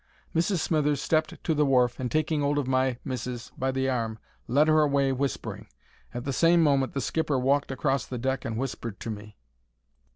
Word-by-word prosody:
Mrs. 170 +4 +2
Smithers 150 -4 +1
stepped 155 +2 +1
on - - -11
to 160 - +1
the 150 0 +2
wharf 125 -3 +2
and, 125 -2 -3
taking 155 -1 +1
'old 145 +1 +1
of 145 - 0
my 130 -1 +1
missis 125 -2 -5
by 130 - -1
the 130 0 -1
arm, 115 -4 -1 0.3
led 145 +6 +3
her 155 0 +5
away 140 -2 +2
whispering. 135 +1 -3 0.4
At 120 - -5
the 140 - -1
same 170 +3 +4
moment 140 -3 +2
the 135 - 0
skipper 150 +3 0
walked 140 +3 +1
across 135 -1 0
the 125 - -5
deck 130 +2 -1
and 110 -1 -3
whispered 120 -4 -4
to 115 - -4
me. 105 0 -9
135 Hz, 200 wpm, -27 LUFS, 125-150 Hz, 0.4 s, her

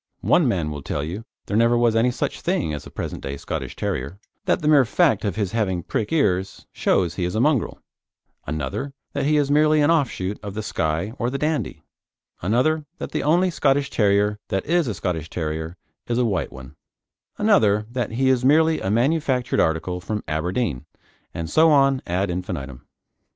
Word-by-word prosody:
One - - +3
man 80 -5 0
will 75 -1 -6
tell 70 +1 -3
you 90 +9 -5 0.2
there 100 - -3
never 115 +2 +4
was 120 -1 +3
any 115 +2 +3
such 125 - -3
thing 80 -2 -1
as 75 - -5
the - - -9
present - - -5
day 70 +1 -5
Scottish - - -5
Terrier, 70 +8 -3 0.3
that 175 - +1
the - - +1
mere 150 -3 +6
fact 110 -2 +2
of 100 -5 -1
his 100 -4 -1
having 95 -6 -1
prick 105 - -2
ears 95 - 0
shows 85 -3 +1
he 90 - -3
is 90 +3 -2
a - - +1
mongrel; 140 -1 +1 0.7
another, 80 - -4 0.2
that - - -1
he 150 0 +3
is 145 -1 +1
merely 155 +1 +4
an 145 +2 +4
offshoot 110 - 0
of 100 -1 -7
the 110 - -3
Skye 80 +3 -2
or 120 - 0
the 140 - -3
Dandie; 150 - -2 0.6
another, 140 - +1
that - - -6
the - - -1
only 175 +5 +3
Scottish 140 -2 +1
Terrier 105 0 +2
that 95 - -2
is 170 -2 +2
a 110 - -2
Scottish 80 -3 -3
Terrier 80 +1 -4 0.3
is 120 - -1
a 125 - +2
white 95 -9 -1
one; 65 0 -11 0.6
another, 105 - +3
that 120 -3 -3
he 130 +3 +1
is 130 -1 +2
merely 160 +4 +4
a 95 - -2
manufactured 130 +2 +1
article 85 +3 0
from 105 +3 -4
Aberdeen, 80 - -2 0.4
and 85 -1 -5
so 160 - +4
on 135 -3 +4
ad 90 +2 0
infinitum. 70 -8 -5
105 Hz, 190 wpm, -23 LUFS, 85-140 Hz, 0.7 s, mere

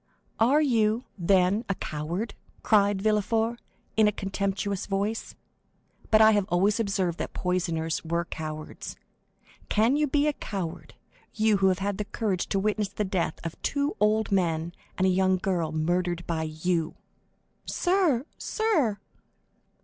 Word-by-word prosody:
"Are 265 +7 +4
you, 225 -3 +2
then, 190 +3 +2
a 195 - +1
coward?" 170 +10 -4 0.3
cried 200 -2 +3
Villefort, 220 +2 +1 0.3
in 220 -1 +5
a - - +3
contemptuous 195 0 -2
voice. 205 +3 -2 0.7
"But 215 0 +6
I 220 0 +8
have 205 -3 +2
always 195 +6 +2
observed 195 -5 0
that - - -4
poisoners 170 -3 -1
were 170 +1 -1
cowards. 155 -1 -6 0.7
Can 225 +5 +3
you 300 0 +2
be 290 +1 +2
a 300 - +2
coward, 190 -10 -6 0.4
you, 215 -1 +3
who 195 0 +3
have 185 -1 +3
had 200 +1 -2
the 210 - -1
courage 200 -3 -2
to - - -1
witness 210 0 0
the 210 - -2
death 185 -4 -1
of 165 - -6
two 285 +1 0
old 215 +1 +2
men 170 -3 0 0.2
and 190 - +2
a 190 - +4
young 185 0 +3
girl 175 -4 -1
murdered 175 +2 -1
by 165 -2 -1
you?" 160 +1 -1 0.7
"Sir! 350 -9 +2
sir!" 320 - +1
195 Hz, 145 wpm, -27 LUFS, 175-220 Hz, 0.7 s, I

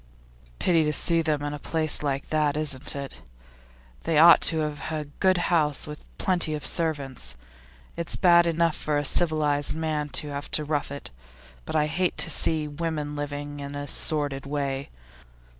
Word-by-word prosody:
'Pity 165 - +3
to 150 - +1
see 165 +2 +3
them 150 -2 -1
in 145 0 -3
a 145 - -6
place 155 0 +1
like 140 -2 -2
that, 150 -1 +1
isn't 150 -2 -2
it? 140 -1 -7 0.8
They 160 - 0
ought 165 +2 +8
to 160 - -2
have 150 +1 -4
a 155 -1 -3
good 185 -1 +4 0.2
house, 150 -4 +1
with 150 0 -8 0.2
plenty 175 -4 +1
of 150 - -6
servants. 140 - -3 0.6
It's 170 -1 -4
bad 170 -1 +5
enough 165 -1 +1
for 150 -1 -1
a 145 - -1
civilised 150 -2 +2
man 155 -2 -2
to 150 - -3
have 140 0 -5
to 155 - -3
rough 145 -1 -1
it, 140 - -7 0.5
but - - -5
I 150 -1 +3
hate 175 +4 -1
to 165 - +1
see 155 0 +2
women 150 -1 -3
living 145 0 -5
in 140 0 -6
a 145 0 -5
sordid 145 -1 -2
way. 140 -1 -3
150 Hz, 175 wpm, -26 LUFS, 145-160 Hz, 0.8 s, ought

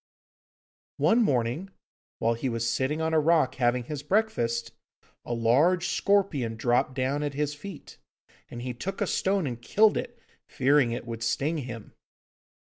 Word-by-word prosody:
One 230 +2 +4
morning, 135 - 0 0.5
while 115 +1 +1
he 115 +3 -3
was 115 -1 -2
sitting 130 +6 0
on 160 0 0
a 160 - +5
rock 155 -4 +3
having 120 0 +2
his 145 +3 -5
breakfast, 145 - 0 0.5
a - - -7
large 155 +10 +3
scorpion 165 - +1
dropped 120 +3 +1
down 135 +2 0
at 145 -2 -3
his 150 0 -1
feet, 170 +2 -10 0.5
and 120 0 -7
he 125 -1 -3
took 185 +11 -5
a - - +1
stone 195 -2 0
and 120 -3 -5
killed 210 - +3
it, 240 0 -5 0.3
fearing 135 -1 +3
it 120 0 -4
would 115 -1 -6
sting 150 +7 0
him. 120 -5 -8
135 Hz, 155 wpm, -27 LUFS, 120-165 Hz, 0.5 s, a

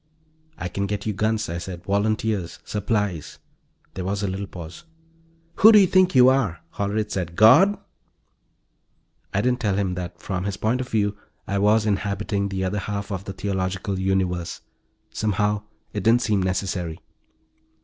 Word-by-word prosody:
"I 90 - -4
can 100 +3 -2
get 100 0 -3
you 110 - -1
guns," 110 +2 0
I 85 +1 -4
said. 90 -1 -7
"Volunteers. 100 -1 -1
Supplies." 105 -6 -2 0.6
There 95 - -5
was 100 +2 -2
a - - +1
little 95 +1 -4
pause. 85 - -9 0.7
"Who 220 - +9
do 215 - +8
you 200 - +7
think 185 -1 +3
you 125 0 +8
are?" 130 -11 +1
Hollerith 105 +1 -2
said. 85 -3 -3
"God?" 130 - +6 1.5
I 100 - +1
didn't 125 0 +1
tell 105 -5 0
him 95 -2 0
that, 90 -1 -6
from 90 -2 -3
his 100 -1 -3
point 115 +5 0
of 125 - -6
view, 105 -2 0 0.3
I 100 0 -1
was 105 +2 +3
inhabiting 100 0 -1
the 95 -1 -2
other 95 +2 -1
half 100 0 -4
of 95 -1 -4
the 95 - -5
theological 95 0 -2
universe. 95 -2 -1 0.5
Somehow, 105 0 0 0.3
it 105 - -2
didn't 115 +5 +4
seem 105 -4 +1
necessary. 95 -3 -2
100 Hz, 160 wpm, -23 LUFS, 95-110 Hz, 1.5 s, Who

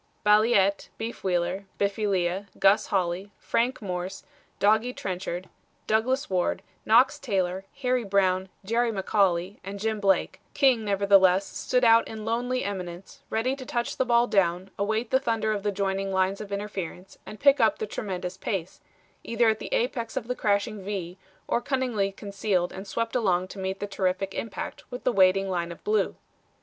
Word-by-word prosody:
Balliet, 210 -2 +4
Beef 230 +1 -6
Wheeler, 180 +1 0
Biffy 205 +1 0
Lea, 190 0 0
Gus 195 +2 +4
Holly, 185 +1 -1
Frank 245 0 -1
Morse, 185 0 -4 0.3
Doggy 220 +4 +3
Trenchard, 185 -2 -4 0.4
Douglas 250 +5 +1
Ward, 180 -2 0 0.2
Knox 255 +6 +5
Taylor, 190 -7 -1 0.2
Harry 250 -1 +2
Brown, 190 -2 +1 0.2
Jerry 230 +3 +1
McCauley, 195 -2 +1
and 200 +1 -6
Jim 220 +1 -1
Blake; 195 -3 +1
King, 260 -6 +4
nevertheless, 195 -2 +4
stood 250 +4 -1
out 230 -1 +6
in 220 -1 -7
lonely 245 +3 -1
eminence, 185 -2 -6
ready 250 +4 0
to 270 - -8
touch 240 -1 -2
the - - +3
ball 240 -1 +4
down, 185 -3 +1
await 220 +3 -1
the 260 - +4
thunder 225 -4 0
of 210 -2 -1
the 205 +1 0
joining 195 0 -1
lines 190 +1 +1
of 205 -1 -8
interference 195 -3 -5
and 215 - -9
pick 280 0 +5
up - - +3
the 440 - -3
tremendous 185 - -5
pace, 190 -2 -4 0.4
either 230 0 +2
at 220 0 0
the - - -7
apex 235 0 -1
of 235 -3 -3
the 250 - -2
crashing 205 -1 0
V 185 -2 -5 0.3
or 235 - +1
cunningly 245 -7 0
concealed 195 -2 -1
and 190 +1 -8
swept 230 +6 -2
along 185 -6 +1
to 195 - -9
meet 190 0 -3
the - - -2
terrific 195 -1 -1
impact 225 - -5
with 245 -1 -7
the 250 - +1
waiting 195 0 +4
line 175 -2 -2
of 170 - -11
Blue. 430 +1 +1
200 Hz, 170 wpm, -26 LUFS, 190-230 Hz, 0.4 s, out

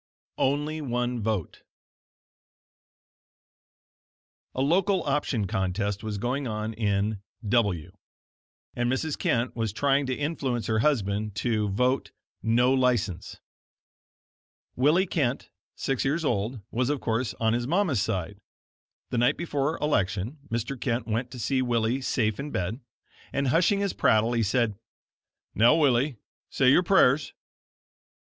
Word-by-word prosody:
ONLY 150 +3 0
ONE 125 -3 -2
VOTE 105 -6 -2 2.9
A 130 - -1
local 180 +5 +2
option 135 -6 0
contest 95 +2 -2
was 110 -2 -3
going 125 +6 -2
on 110 0 -3
in 105 -1 -1 0.3
W, 100 -7 +1 0.8
and 120 0 0
Mrs. 145 +3 -1
Kent 120 +1 0
was 115 -3 -1
trying 140 +4 +1
to 130 - -1
influence 135 -6 -2
her 110 -1 +1
husband 105 -6 0
to 110 -2 0
vote 125 +6 +1 0.3
"No 120 +3 +3
License." 120 -9 0 1.4
Willie 150 +9 +3
Kent, 140 -8 -1 0.2
six 135 -2 -1
years 150 +4 0
old, 115 -1 -1
was, 125 +2 0
of 145 -1 0
course 115 -4 -1
on 110 0 +1
his 120 +1 -1
mamma's 165 - +1
side. 95 0 -3 0.7
The 120 - 0
night 120 - +3
before 155 -2 -1
election 105 -1 -1
Mr. 120 +3 -3
Kent 120 -2 -1
went 115 +3 -2
to 125 - -9
see 130 +3 0
Willie 120 +1 0
safe 110 -5 0
in 145 +2 -4
bed, 95 0 -3 0.5
and 140 -1 0
hushing 185 - +3
his 200 -2 0
prattle, 110 +2 +3
he 115 - +1
said: 110 -1 0 0.7
"Now, 115 +3 +5
Willie, 140 -3 +2 0.3
say 130 -1 +3
your 175 - +6
prayers." 155 -6 +3
120 Hz, 130 wpm, -27 LUFS, 110-140 Hz, 2.9 s, your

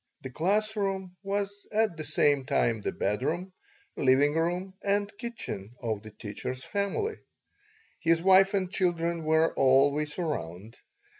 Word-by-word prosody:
The 130 - -6
class 210 - +1
room 190 -3 -2
was 200 0 -3
at 215 -4 +1
the 155 - -5
same 145 -2 +2
time 115 -6 +1
the - - -2
bedroom, 155 - -2 0.4
living 140 +2 +3
room, 175 +4 -1
and 200 0 0
kitchen 125 - -6
of 110 -4 -3
the 110 - -10
teacher's 110 +5 -6
family. 205 - -2 0.8
His 165 -1 +3
wife 190 +2 +5
and 185 -2 0
children 170 -3 0
were 160 +1 +3
always 140 +3 +3
around. 110 - -4
165 Hz, 135 wpm, -28 LUFS, 135-195 Hz, 0.8 s, wife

